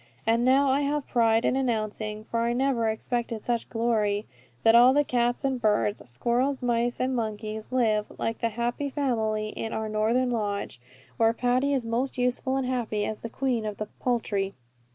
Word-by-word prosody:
And 230 +1 +2
now 270 +2 +4
I 270 +2 +2
have 290 0 -1
pride 230 -1 +3
in - - +2
announcing, 215 -4 -2
for 230 +1 -3
I 235 +1 +1
never 245 -3 +1
expected 230 0 -3
such 235 -2 -1
glory, 220 -3 0 0.4
that 225 - +6
all 245 +2 +7
the 290 +1 +4
cats 245 0 0
and 260 -2 -1
birds, 210 -1 +1
squirrels, 245 - 0
mice, 240 0 0
and 255 0 0
monkeys, 215 -1 -4
live, 220 -4 +2
like 225 - -2
the 230 - 0
happy 240 +5 -2
family, 220 -6 -1
in 225 +1 -5
our 220 0 -2
northern 230 +4 +1
lodge, 205 - -3 0.4
where 225 0 +4
Patty 250 +4 +1
is 265 -4 0
most 240 +4 -1
useful 250 +2 0
and 265 - -1
happy 235 -5 -1
as 215 0 -4
the 230 - -5
Queen 250 -2 -1
of 210 -2 -4
the 215 0 -5
poultry. 205 -5 -1
235 Hz, 180 wpm, -27 LUFS, 215-255 Hz, 0.4 s, all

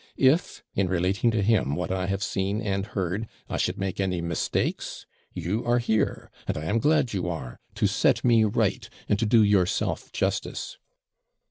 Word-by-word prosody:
If, 135 +6 +2
in 95 -1 +1
relating 95 +5 +1
to 110 -3 +1
him 95 -10 +2
what 90 +2 -3
I 95 -1 -1
have 100 +1 -1
seen 100 +2 -1
and 100 -2 -2
heard, 100 +2 -2 0.2
I - - -3
should - - 0
make 95 0 -3
any 95 -2 0
mistakes, 85 -1 -2 0.3
you 105 +7 -2
are 120 0 +2
here; 110 -3 0 0.2
and - - -1
I 75 - -4
am 105 +8 +1
glad 150 -3 +2
you 90 -3 -1
are, 65 -8 -6 0.2
to - - +1
set - - +2
me 115 -2 +5
right, 105 - 0 0.2
and 105 - +1
to 115 - +1
do 110 0 +5
yourself 100 -4 +1
justice.' - - -2
100 Hz, 175 wpm, -26 LUFS, 90-110 Hz, 0.3 s, me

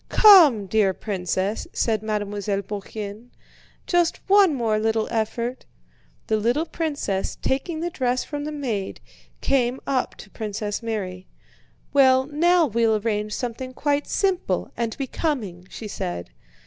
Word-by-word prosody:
"Come, 325 - +7
dear 195 -1 +2
princess," 190 0 -2
said 220 -3 0
Mademoiselle 205 -1 -2
Bourienne, 205 +3 -7 0.6
"just 350 -2 +2
one 390 -5 +5
more 225 -4 +1
little 220 0 +1
effort." 235 +3 -2 0.6
The 220 - +1
little 240 +9 +1
princess, 285 - -2
taking 315 +5 -2
the 345 +1 -2
dress 255 -4 0
from 290 -1 -5
the 305 - -3
maid, 235 -10 -3 0.4
came 255 -1 +1
up 260 -2 -1
to - - -13
Princess 210 -1 -4
Mary. 190 -5 -4 0.7
"Well, 260 -2 +5
now 335 +4 +3
we'll 230 -3 +2
arrange 210 -1 -2
something 255 +1 -5
quite 290 0 0
simple 385 -2 0
and 230 -2 -3
becoming," 245 - -3
she 220 - -7
said. 85 - -5
230 Hz, 130 wpm, -24 LUFS, 210-285 Hz, 0.7 s, Come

